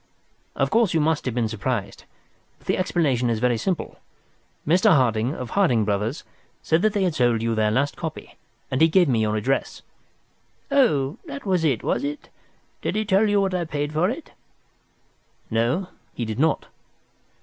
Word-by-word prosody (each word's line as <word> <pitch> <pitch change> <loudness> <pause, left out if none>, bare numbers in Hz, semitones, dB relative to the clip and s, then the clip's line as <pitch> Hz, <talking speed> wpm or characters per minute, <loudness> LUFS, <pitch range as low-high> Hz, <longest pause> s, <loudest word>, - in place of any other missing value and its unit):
"Of - - 0
course 225 -6 +2
you - - +4
must 160 0 +1
have 125 -3 -2
been 120 -2 +1
surprised, 110 -4 -4 0.5
but - - -26
the - - +1
explanation 140 -10 +1
is 115 - 0
very 125 +1 +2
simple. 180 - -3 0.7
Mr. 175 +4 +4
Harding, 120 0 +1
of 125 - -6
Harding 125 - +2
Brothers, 105 +6 -2 0.4
said 160 +1 +2
that 215 0 +2
they 200 - +1
had 180 -3 +1
sold 120 -5 +1
you 115 0 0
their 110 -1 +2
last 135 +6 0
copy, 160 -2 -7 0.4
and 130 - 0
he 160 - +7
gave 175 +1 +4
me 120 -5 +2
your 105 0 0
address." 125 +6 -1 0.9
"Oh, 155 - +2
that 285 -3 -7
was 185 -4 +1
it, 135 -8 +1
was - - 0
it? 290 +1 -5 0.5
Did - - -2
he 215 0 0
tell 205 +1 +3
you 205 0 +3
what 190 -1 0
I 180 -1 0
paid 150 -2 -3
for 170 +5 +2
it?" 270 +7 -6 1.2
"No, 120 - 0 0.3
he 120 - -3
did 110 +2 -4
not." 155 0 +1
150 Hz, 180 wpm, -23 LUFS, 115-185 Hz, 1.2 s, he